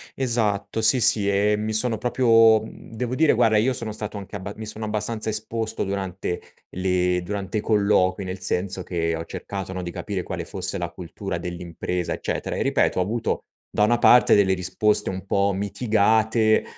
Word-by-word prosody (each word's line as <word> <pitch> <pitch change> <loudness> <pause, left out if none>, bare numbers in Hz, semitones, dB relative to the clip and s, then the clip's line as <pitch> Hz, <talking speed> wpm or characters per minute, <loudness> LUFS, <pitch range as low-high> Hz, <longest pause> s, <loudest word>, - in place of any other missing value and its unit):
Esatto, 115 -4 -1
sì, 110 +4 +6
sì 100 -3 +4
e 100 +1 +2
mi 110 +1 -3
sono 110 +1 +2
proprio 115 -2 +4
mhmm, 110 - -12
devo 125 +1 -3
dire, 155 +4 +3
guarda, 115 -2 +3
io 125 +5 +2
sono 115 -3 -4
stato 105 0 -6
anche 100 0 -9
abba 100 +1 -7
mi 110 - -7
sono 110 0 -3
abbastanza 110 +1 -2
esposto 110 +1 -1
durante 95 -2 -4 0.3
le 90 -1 0
durante 100 +2 -4
i - - -1
colloqui, 100 -3 +2
nel 95 +1 -6
senso 95 +1 -1
che 85 -2 -2
ho 80 - -5
cercato, 95 +2 -6
no, 95 -1 -5
di 85 - -5
capire 95 0 -4
quale - - -5
fosse - - -4
la - - -3
cultura 90 +1 -6
dell'impresa, 85 0 -4
eccetera; - - -4
e, - - -2
ripeto, - - +1
ho - - +3
avuto, 115 +5 -2 0.3
da 105 - +1
una 120 +3 +3
parte, 125 +1 +6
delle 95 -2 +4
risposte 100 +3 +1
un 95 0 -6
po' 100 +1 +1
mitigate, 110 +2 +2
105 Hz, 180 wpm, -23 LUFS, 95-110 Hz, 0.3 s, sì